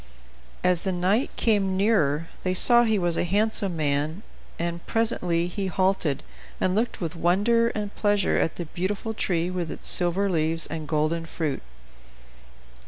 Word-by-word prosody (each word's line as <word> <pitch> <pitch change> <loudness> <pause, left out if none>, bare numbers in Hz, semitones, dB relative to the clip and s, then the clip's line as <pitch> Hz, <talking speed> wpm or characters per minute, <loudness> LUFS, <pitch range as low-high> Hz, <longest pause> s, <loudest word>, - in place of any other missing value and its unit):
As 180 -1 +2
the 190 - 0
knight 185 +8 +1
came 200 -4 +1
nearer 165 -7 +2 0.2
they 185 0 0
saw 240 +5 +7
he 220 -2 +2
was 175 -3 0
a - - +1
handsome 200 0 0
man; 150 +5 -1 0.3
and 170 0 -3
presently 180 -7 0
he 190 +2 -3
halted, 185 -6 0 0.4
and 185 - +1
looked 225 +4 -1
with 170 -2 -4
wonder 205 +8 +2
and 210 -1 -4
pleasure 205 -2 +1
at 165 - 0
the 175 - -5
beautiful 195 +7 -3
tree 180 -4 -1
with 180 -3 -3
its - - -7
silver 180 +3 +2
leaves 165 -2 0
and 155 -2 -6
golden 160 +2 0
fruit. 155 -4 -3
180 Hz, 155 wpm, -25 LUFS, 165-205 Hz, 0.4 s, saw